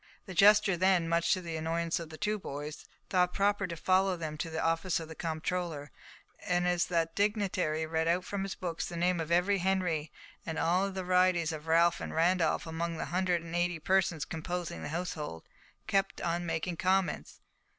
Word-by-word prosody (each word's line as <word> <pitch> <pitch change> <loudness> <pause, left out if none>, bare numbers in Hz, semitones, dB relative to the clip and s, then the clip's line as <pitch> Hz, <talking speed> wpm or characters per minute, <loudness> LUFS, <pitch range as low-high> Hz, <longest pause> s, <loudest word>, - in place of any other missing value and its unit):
The 190 - -7
jester 205 +1 +6
then, 180 -1 +3
much 170 0 +2
to 185 - -5
the 165 -2 -5
annoyance 165 +1 -1
of 165 -2 -7
the 160 - -9
two 210 +2 -1
boys, 145 -2 -7 0.3
thought 180 -1 +2
proper 200 0 +2
to 170 - -5
follow 185 +2 +2
them 155 -2 -4
to 165 - -2
the 160 0 -3
office 165 +3 +1
of 160 - -7
the 160 - -8
comptroller, 160 -2 -3 0.5
and 180 0 0
as 175 -1 +1
that 165 -2 0
dignitary 195 -6 0
read 160 0 -1
out 180 +2 +1
from 200 0 -3
his 195 0 -3
books 170 -3 -4
the 170 - -6
name 175 +1 +1
of 165 0 -4
every 185 +3 +3
Henry, 180 -5 0 0.3
and 160 -1 -4
of - - 0
all 185 +4 +2
the 190 -1 -4
varieties 180 -2 +3
of 155 0 -7
Ralf 170 +1 +4
and - - -5
Randolf 165 0 +2
among 165 +1 -3
the - - -3
hundred 180 -2 +1
and 165 0 -6
eighty 175 0 +1
persons 180 -2 +1
composing 165 - -4
the - - -5
household, 155 - -4 0.4
he - - -42
kept 195 0 0
on 175 0 -2
making 165 +1 -2
comments. 185 -3 0
175 Hz, 200 wpm, -31 LUFS, 160-185 Hz, 0.5 s, jester